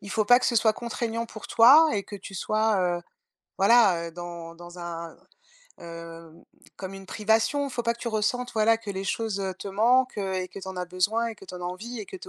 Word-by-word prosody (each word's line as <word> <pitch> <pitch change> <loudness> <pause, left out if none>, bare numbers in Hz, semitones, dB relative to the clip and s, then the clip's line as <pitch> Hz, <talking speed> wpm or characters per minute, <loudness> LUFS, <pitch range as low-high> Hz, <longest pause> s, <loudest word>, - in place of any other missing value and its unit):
il 200 - -10
faut 215 - +1
pas 245 +4 +6
que - - 0
ce 235 - +1
soit 220 0 +4
contraignant 230 0 -3
pour 215 -2 -10
toi 285 +8 +7
et 205 - -1
que 205 - -9
tu 195 0 -11
sois, 200 -3 +1
heu, - - -13 0.6
voilà, 195 -5 +5
heu, - - -9
dans 170 -1 -8
dans 175 +1 -12
un 170 -1 -6 0.7
heu, 165 -1 -10 0.5
comme 190 0 -7
une 195 -1 -10
privation. 225 +8 +1
Faut 245 -2 -3
pas 235 - +1
que 235 - -15
tu 235 - -8
ressentes, 235 +3 -1
voilà, 225 +1 +3
que 225 -2 -13
les 195 -1 -3
choses, 200 +1 -2
heu, 190 -1 -2
te 190 - -9
manquent 235 +5 +2
et 190 -2 -2
que 195 - -10
tu 190 - -8
en 190 - -7
as 180 - -2
besoin 205 +6 0
et 225 - -6
que 205 - -15
tu 185 - -10
en - - -9
as - - -5
envie 210 +7 -6
et 210 - -6
que - - -8
tu 375 - -11
205 Hz, 245 wpm, -26 LUFS, 180-230 Hz, 0.7 s, toi